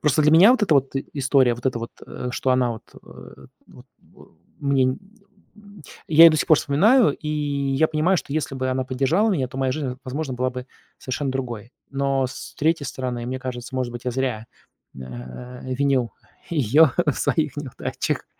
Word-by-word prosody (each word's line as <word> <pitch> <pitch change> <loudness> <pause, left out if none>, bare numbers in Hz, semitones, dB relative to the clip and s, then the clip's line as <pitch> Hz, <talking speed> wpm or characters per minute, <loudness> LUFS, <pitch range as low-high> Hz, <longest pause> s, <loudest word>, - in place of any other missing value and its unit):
Просто 150 0 +2
для 150 +1 +4
меня 180 +8 +8
вот 255 - 0
эта 190 -7 +3
вот 135 -1 +1
и 135 - -3
история, 135 -3 +3
вот 120 +2 -5
эта 125 -3 0
вот, 115 - -6 0.2
э, 125 - -6
что 130 - -1
она, 125 -2 +2
вот, 110 - -9 0.2
э, - - -14 0.2
вот, - - -16 0.2
вэу - - -20 0.3
мне 140 -2 +2
нь 130 - -1 0.6
нь 205 -3 -16 0.3
Я 160 +1 +8
ее 165 - +10
до 155 - +1
сих - - -1
пор 155 - +7
вспоминаю, 210 - +4
и 150 - -7
я 145 -1 0
понимаю, 160 +5 +2
что 145 - -5
если 150 -2 -2
бы 130 0 -2
она 130 0 0
поддержала 140 - +1
меня, 145 -10 0
то 130 - -10
моя 135 -1 +1
жизнь, 135 -3 -4
возможно, 135 +1 -4
была 130 +1 -1
бы 125 0 -7 0.3
совершенно 135 +2 -3
другой. 120 -3 -5 0.2
Но 135 -1 0
с 125 - -9
третьей 155 -1 +1
стороны, 125 -2 -4
мне 130 +1 -3
кажется, 125 0 -6
может 125 -2 -2
быть, 120 0 -8
я - - +1
зря, 125 -4 -2 0.5
н 65 - -8
а, 65 - -9
а, 130 - -7
винил 130 -4 +1 0.4
ее 150 0 +4 0.2
в 150 - +3
своих 150 -4 -1
неудачах. 145 -4 -4
135 Hz, 200 wpm, -23 LUFS, 125-150 Hz, 0.6 s, ее